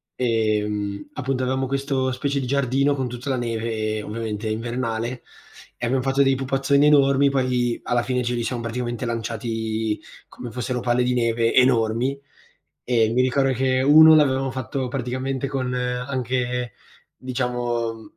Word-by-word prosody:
Ehm, 105 +1 -1
appunto 130 -1 -2
avevamo 130 +1 0
questo 135 -1 -1
specie 140 +2 -1
di - - -3
giardino 140 +1 +1
con 130 -2 -2
tutta 125 +3 -6
la 130 - 0
neve, 110 -2 -2
ovviamente 110 0 -4
invernale, 120 +1 -3 0.5
e 120 - -3
abbiam 130 +2 +1
fatto 135 +2 +2
dei 135 0 +3
pupazzoni 135 +2 +2
enormi, 140 -1 +4
poi 125 -3 0
alla 120 -1 +1
fine 125 0 -1
ce 125 0 -1
li 120 -1 -1
siamo 120 0 -3
praticamente 120 +1 -3
lanciati 110 -1 -3 0.3
come 120 - -9
fossero 125 +1 -3
palle 125 0 +1
di 125 0 +1
neve 115 -1 +1
enormi, 125 +1 +2 0.6
e 115 -3 +2
mi 125 - +2
ricordo 135 +1 +2
che 130 +1 +1
uno 155 +3 +8
l'avevamo 135 -3 +2
fatto 130 0 -3
praticamente 130 +1 -3
con 130 -2 -2
anche, 125 -1 -2 0.4
diciamo, 120 0 -3
125 Hz, 145 wpm, -23 LUFS, 115-135 Hz, 0.6 s, uno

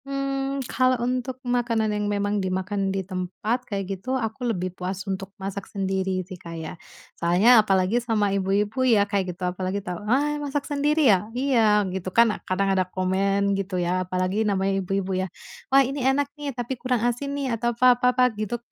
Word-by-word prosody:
Mmm, 275 0 -2
kalau 255 +1 +2
untuk 255 +1 -2
makanan 235 -3 +1
yang 210 0 -1
memang 205 0 0
dimakan 190 +1 -1
di 190 -1 -2
tempat, 190 +6 -2
kayak 200 -2 -2 0.2
gitu, 260 +5 -1
aku 240 +1 -3
lebih 185 -4 -2
puas 185 +1 -4
untuk 195 0 -4
masak 195 0 -6
sendiri 190 -2 -1
sih 185 -1 -10
Kak 165 -1 -8
ya. 160 -1 -6 0.5
Soalnya 200 +8 +6
apalagi 195 +3 +2
sama 215 -4 +1
ibu-ibu 200 +5 0
ya 225 -6 +4
kayak 190 -4 -2
gitu, 185 - -3
apalagi 185 +1 -3
tau, 180 0 -5
"Ah 295 +4 +1
masak 285 -1 -2
sendiri 295 +1 +1
ya?" 195 +3 -1
"Iya," 225 -6 +3
gitu 185 -1 -3
kan, 230 +3 +4 0.2
kadang 195 +1 +1
ada 185 -1 0
komen 195 +2 +1
gitu 195 -1 -2
ya, 180 +1 0
apalagi 185 +3 0
namanya 195 -2 +1
ibu-ibu 190 0 -1
ya, 190 - -3 0.4
"Wah 270 0 +6
ini 275 +2 -3
enak 275 +2 +1
nih, 295 -1 -5
tapi 245 0 -4
kurang 250 -2 0
asin 280 +4 -1
nih," 270 -4 -1
atau 235 +1 0
apa 250 0 +7
apa 245 +1 -3
apa 250 0 +3 0.2
gitu. 215 +3 -2
205 Hz, 185 wpm, -24 LUFS, 190-250 Hz, 0.5 s, apa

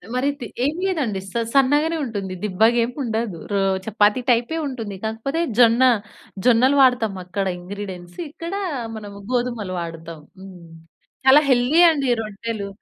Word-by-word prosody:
మరి 255 +2 +1
తి 240 - -6 0.2
ఏమి 300 +5 -1
లేదండి. 270 - -1
స - - -18 0.2
సన్నగానే 290 +4 +3
ఉంటుంది. 200 -6 -5
దిబ్బగా 220 +4 +2
ఏముండదు. 230 - -3
రొ 200 - +1 0.3
చపాతీ 210 +2 +2
టైపే 245 +7 +2
ఉంటుంది. 225 -7 -6
కాకపోతే 225 +8 -3 0.2
జొన్న 235 +1 +5 0.6
జొన్నలు 250 +4 +4
వాడతాం 245 -6 +3
అక్కడ 195 +2 -3
ఇంగ్రీడియెంట్స్. 180 -1 -8
ఇక్కడ 335 +4 -7 0.4
మనము 205 -1 -9
గోధుమలు 240 -6 -2
వాడతాం. 165 -1 -8 0.2
హ్మ్. 185 -3 -12 0.6
చాలా 275 +3 +8
హెల్తీ 255 +6 +3
అండి 280 -4 -1
రొట్టెలు. 215 0 -5
230 Hz, 130 wpm, -21 LUFS, 200-260 Hz, 0.6 s, చాలా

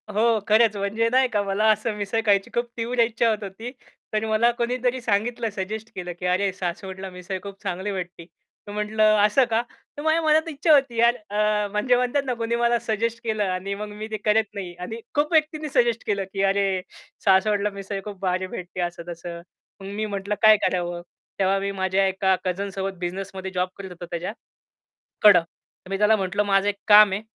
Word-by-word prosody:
हो, 220 +2 +2
खरंच 220 0 +4
म्हणजे 205 +3 0
नाही 260 +2 +4
का, 210 -4 0
मला 200 +2 0
असं 215 +1 -1
मिसळ 210 +2 -2
खायची 200 -2 +3
खूप 240 0 0
तीव्र 235 +2 -2
इच्छा 230 0 +3
होत 215 -1 -1
होती. 205 +5 -7 0.4
तर 215 0 0
मला 220 +2 +3
कोणीतरी 245 +1 -1
सांगितलं, 230 +2 0
सजेस्ट 210 +2 -5
केलं, 180 -1 -5
की 180 - -5
"अरे, 185 +2 +1
सासवडला 190 +1 -5
मिसळ 180 +1 -6
खूप 200 -1 -9
चांगली 190 +3 -3
भेटती." 180 -3 -6 0.4
तर - - -7
म्हटलं, 210 +1 0 0.2
"असं 210 +6 +4
का?" 225 0 +2 0.4
तर - - -4
माझ्या 315 +1 +2
मनात 315 +1 +3
इच्छा 310 +1 +3
होती 270 -5 +3
यार, 235 +1 +5
अ, 210 0 +1
म्हणजे 210 +5 +2
म्हणतात 250 +3 +1
ना, 255 - -1
कुणी 230 0 -2
मला 235 0 +2
सजेस्ट 230 +1 -2
केलं 215 -2 0
आणि 185 +2 -3
मग 210 +1 -5
मी 210 +1 -7
ते 215 - -2
करत 215 0 +3
नाही 190 -4 -6
आणि 220 +6 -6 0.2
खूप 295 +2 +1
व्यक्तींनी 310 -1 +1
सजेस्ट 235 -3 +2
केलं 200 -2 0
की, 195 - -1
"अरे, 195 -1 +1 0.4
सासवडला 205 +1 +3
मिसळ 200 0 -6
खूप 205 -2 -7
भारी 185 0 -1
भेटते." 180 0 -7
असं-तसं. 170 0 -5 0.4
मग - - -9
मी 215 +1 -1
म्हटलं, 200 0 -3
"काय 215 -1 +8
करावं?" 175 -1 -2 0.4
तेव्हा 195 0 +2
मी 200 0 -2
माझ्या 190 0 +1
एका 190 0 +2
कझनसोबत 195 +1 -3
बिझनेसमध्ये 190 +1 -5
जॉब 180 0 -1
करत 195 -1 -7
होतो 175 0 -8
त्याच्याकडं. 175 +5 -7 1.3
तर - - -13
मी 195 - -1
त्याला 210 +2 +4
म्हटलं, 195 0 0
"माझं 195 0 +2
एक 205 - -2
काम 210 -1 +8
आहे 200 - -2
205 Hz, 190 wpm, -24 LUFS, 190-230 Hz, 1.3 s, काय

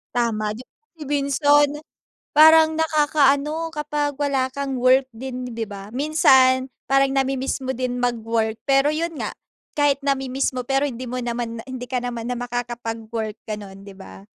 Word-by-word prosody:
Tama, 215 -3 0
di 255 - -11
ba - - -75 0.3
minsan 290 +1 +3 0.7
parang 315 0 +7
nakakaano 305 0 +2
kapag 295 -1 -2
wala 275 -2 +1
kang 275 -1 -3
work 255 +1 +4
din 255 0 -6
di 230 -1 -3
ba? 200 -1 -9
Minsan 265 -3 +4 0.2
parang 275 0 +3
namimiss 270 0 0
mo 260 - -1
din 250 0 -2
mag-work. 225 -2 -1
Pero 275 +2 +4
yun 330 +1 -3
nga. - - -3 0.4
Kahit 290 -2 +2
namimiss 270 -1 0
mo 250 - -2
pero 270 +2 +1
hindi 255 -1 -6
mo 255 - -4
naman 235 -1 -3
na 225 - -7
hindi 255 -1 -6
ka 255 - 0
naman 235 -1 -4
na 245 - -2
makakapagwork 230 -2 -4
ganon, 200 -2 -7
di 200 0 -12
ba? 95 - -12
260 Hz, 160 wpm, -22 LUFS, 235-285 Hz, 0.7 s, parang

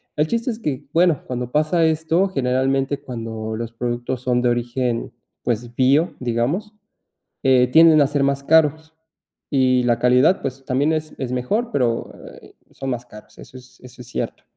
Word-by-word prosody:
El 150 - +2
chiste 230 +8 -2
es 220 - -3
que 145 - -4
bueno, 170 -3 +3
cuando 125 -1 -4
pasa 155 +2 +2
esto, 160 +4 +1
generalmente, 135 -1 0
cuando 110 -2 -6
los 115 0 -5
productos 120 +1 -3
son 125 -1 +1
de 125 - +2
origen, 120 0 -2 0.3
pues, 120 0 -3
bio, 140 +7 +2
digamos, 130 - -2 0.7
eh, 130 -2 +4
tienden 160 -2 +7
a 140 - +4
ser 145 -1 0
más 140 0 0
caros 160 +1 +2 0.6
y 130 -2 +3
la 120 -1 +2
calidad, 125 +9 +4
pues, 135 0 -5
también 140 +5 +1
es 155 0 -3
es 130 -2 -4
mejor, 210 - -1
pero, 120 - -1 0.3
eh, - - -17 0.2
son 135 - -6
más 120 0 -4
caros. 105 -2 -15
Eso 130 - -12
es 125 0 -17
eso 125 0 -13
es 120 - -12
cierto. - - -5
130 Hz, 175 wpm, -21 LUFS, 125-155 Hz, 0.7 s, tienden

